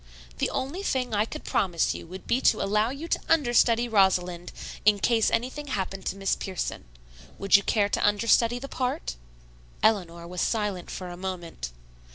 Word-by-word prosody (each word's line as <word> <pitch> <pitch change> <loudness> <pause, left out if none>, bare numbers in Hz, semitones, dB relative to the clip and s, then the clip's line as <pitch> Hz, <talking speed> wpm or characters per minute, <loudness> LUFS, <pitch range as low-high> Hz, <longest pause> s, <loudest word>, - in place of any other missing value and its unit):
The - - +1
only 290 +9 -3
thing 255 - -1
I 210 +1 +2
could 305 +6 -8
promise 180 -6 +1
you - - -8
would 185 +3 -9
be 255 - +1
to 220 - +4
allow 210 +3 +2
you 280 +6 -6
to - - 0
understudy 240 -6 +4
Rosalind 180 -5 +2 0.3
in 210 0 +5
case 225 +2 +3
anything 260 +6 -2
happened 195 -6 -3
to - - -1
Miss 195 -1 0
Pierson. 190 -2 -4 0.5
Would 195 -1 +4
you 200 - +7
care 205 0 +1
to - - 0
understudy 230 +3 +3
the 270 +3 -6
part?" 155 - -2 0.7
Eleanor 175 -6 +1
was 180 +1 -4
silent 210 -5 -1
for 185 -1 -6
a 175 - -8
moment. 175 - -5
205 Hz, 175 wpm, -27 LUFS, 185-240 Hz, 0.7 s, you